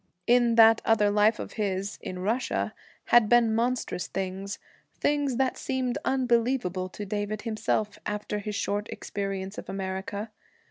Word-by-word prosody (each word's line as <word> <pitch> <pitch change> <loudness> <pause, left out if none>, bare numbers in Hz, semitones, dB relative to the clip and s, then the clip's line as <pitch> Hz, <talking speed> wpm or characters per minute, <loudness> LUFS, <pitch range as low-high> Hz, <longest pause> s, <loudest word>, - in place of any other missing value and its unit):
In 240 -1 +4
that 225 0 +7
other 210 -2 +3
life 210 +2 +4
of - - -7
his, 195 0 -2
in 185 - -6
Russia, 235 +5 -1 0.4
had 240 -3 +7
been 240 -2 +5
monstrous 235 -5 -1
things, 195 +1 -4 0.4
things 285 -3 +1
that 260 +1 0
seemed 260 0 -1
unbelievable 235 -7 +1
to 205 +3 -7
David 205 +1 -3
himself, 215 -1 -1
after 210 0 -3
his 210 0 -4
short 205 +1 -2
experience 195 -1 -4
of - - -10
America. 195 +2 -4
210 Hz, 140 wpm, -27 LUFS, 200-240 Hz, 0.4 s, that